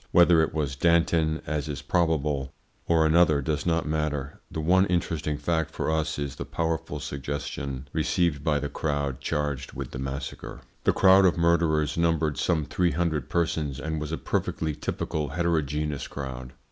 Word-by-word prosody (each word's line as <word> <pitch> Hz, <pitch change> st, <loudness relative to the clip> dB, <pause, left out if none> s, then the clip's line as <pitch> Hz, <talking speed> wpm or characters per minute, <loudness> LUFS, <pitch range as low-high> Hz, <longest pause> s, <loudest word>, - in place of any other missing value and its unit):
Whether 85 Hz, -2 st, +6 dB
it 80 Hz, -, +1 dB
was 75 Hz, -4 st, -2 dB
Danton, 80 Hz, 0 st, +2 dB
as 75 Hz, 0 st, -2 dB
is 70 Hz, -1 st, -5 dB
probable, 75 Hz, -4 st, 0 dB, 0.4 s
or 80 Hz, -1 st, +4 dB
another 80 Hz, -2 st, +4 dB
does 75 Hz, +3 st, -2 dB
not 85 Hz, -1 st, +1 dB
matter; 75 Hz, -2 st, -2 dB
the -, -, -5 dB
one 95 Hz, +5 st, +4 dB
interesting 80 Hz, -4 st, -1 dB
fact 80 Hz, +1 st, 0 dB
for 80 Hz, -, -2 dB
us 80 Hz, 0 st, 0 dB
is 70 Hz, -2 st, -4 dB
the -, -, -3 dB
powerful 80 Hz, -2 st, -2 dB
suggestion 70 Hz, -1 st, -5 dB
received 85 Hz, -5 st, +1 dB
by 75 Hz, -1 st, +2 dB
the 75 Hz, 0 st, -2 dB
crowd 70 Hz, -3 st, -2 dB
charged 70 Hz, -2 st, -2 dB
with 70 Hz, -1 st, -6 dB
the 65 Hz, -, -6 dB
massacre. 70 Hz, +1 st, -5 dB, 0.2 s
The -, -, +5 dB
crowd 95 Hz, 0 st, +6 dB
of 90 Hz, -, +3 dB
murderers 85 Hz, -3 st, +2 dB
numbered 80 Hz, -3 st, +1 dB
some 80 Hz, -4 st, +1 dB
three 90 Hz, +1 st, +1 dB
hundred 80 Hz, -4 st, -1 dB
persons, 80 Hz, -5 st, -1 dB
and 80 Hz, 0 st, -3 dB
was 75 Hz, 0 st, -4 dB
a 80 Hz, -, -1 dB
perfectly 80 Hz, -2 st, -2 dB
typical 75 Hz, +1 st, -3 dB
heterogeneous 75 Hz, -2 st, -1 dB
crowd. 65 Hz, -2 st, -7 dB
75 Hz, 165 wpm, -26 LUFS, 70-85 Hz, 0.4 s, Whether